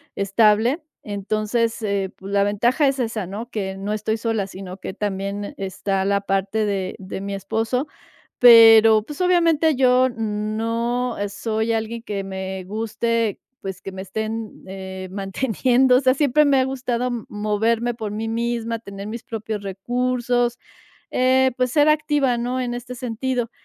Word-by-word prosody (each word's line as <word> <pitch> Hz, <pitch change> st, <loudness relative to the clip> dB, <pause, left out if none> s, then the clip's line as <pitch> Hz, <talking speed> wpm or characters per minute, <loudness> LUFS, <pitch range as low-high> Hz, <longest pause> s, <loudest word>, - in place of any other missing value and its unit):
estable. 215 Hz, -, +3 dB, 0.2 s
Entonces, 215 Hz, +3 st, -1 dB
eh, 200 Hz, -2 st, -1 dB
pues 195 Hz, +1 st, -9 dB
la 200 Hz, 0 st, +4 dB
ventaja 240 Hz, +8 st, +2 dB
es 270 Hz, -, +1 dB
esa, 225 Hz, -5 st, -2 dB
¿no? 215 Hz, +6 st, -6 dB
Que 190 Hz, -3 st, -3 dB
no 200 Hz, +2 st, -3 dB
estoy 215 Hz, +1 st, -1 dB
sola, 220 Hz, -3 st, -1 dB
sino 190 Hz, -1 st, -8 dB
que 190 Hz, -, -6 dB
también 200 Hz, 0 st, -3 dB
está 195 Hz, 0 st, -2 dB
la 200 Hz, 0 st, +1 dB
parte 195 Hz, +2 st, 0 dB
de 195 Hz, -2 st, -2 dB
de 190 Hz, 0 st, -7 dB
mi 200 Hz, 0 st, -4 dB
esposo. 225 Hz, -, -1 dB, 0.5 s
Pero, 225 Hz, -2 st, +8 dB
pues, 295 Hz, -, -10 dB
obviamente 330 Hz, -4 st, +3 dB
yo 255 Hz, 0 st, +4 dB
no 230 Hz, +2 st, -2 dB
soy 220 Hz, +2 st, -2 dB
alguien 225 Hz, +1 st, -3 dB
que 205 Hz, -4 st, -4 dB
me 190 Hz, -1 st, -5 dB
guste, 225 Hz, +2 st, -1 dB, 0.2 s
pues, 190 Hz, -1 st, -6 dB
que 195 Hz, -, -7 dB
me 190 Hz, -, -6 dB
estén, 220 Hz, +3 st, -5 dB
eh, 190 Hz, -1 st, -7 dB
manteniendo. 245 Hz, +6 st, +2 dB
O -, -, +4 dB
sea, 255 Hz, -1 st, +4 dB
siempre 290 Hz, +1 st, +3 dB
me 280 Hz, -2 st, +4 dB
ha -, -, +3 dB
gustado 250 Hz, -2 st, -2 dB, 0.2 s
moverme 220 Hz, +3 st, 0 dB
por 220 Hz, -3 st, -5 dB
mí 220 Hz, +1 st, -3 dB
misma, 230 Hz, 0 st, -2 dB
tener 200 Hz, -2 st, -9 dB
mis 230 Hz, +2 st, -6 dB
propios 220 Hz, -2 st, -5 dB
recursos, 245 Hz, +4 st, -1 dB, 0.5 s
eh, 260 Hz, +1 st, +3 dB
pues, 255 Hz, -1 st, 0 dB
ser 295 Hz, -1 st, +4 dB
activa, 295 Hz, -5 st, +2 dB
¿no? 250 Hz, +2 st, -2 dB
en 240 Hz, -1 st, -2 dB
este 245 Hz, +1 st, -6 dB
sentido. 245 Hz, 0 st, -2 dB
225 Hz, 155 wpm, -22 LUFS, 200-245 Hz, 0.5 s, Pero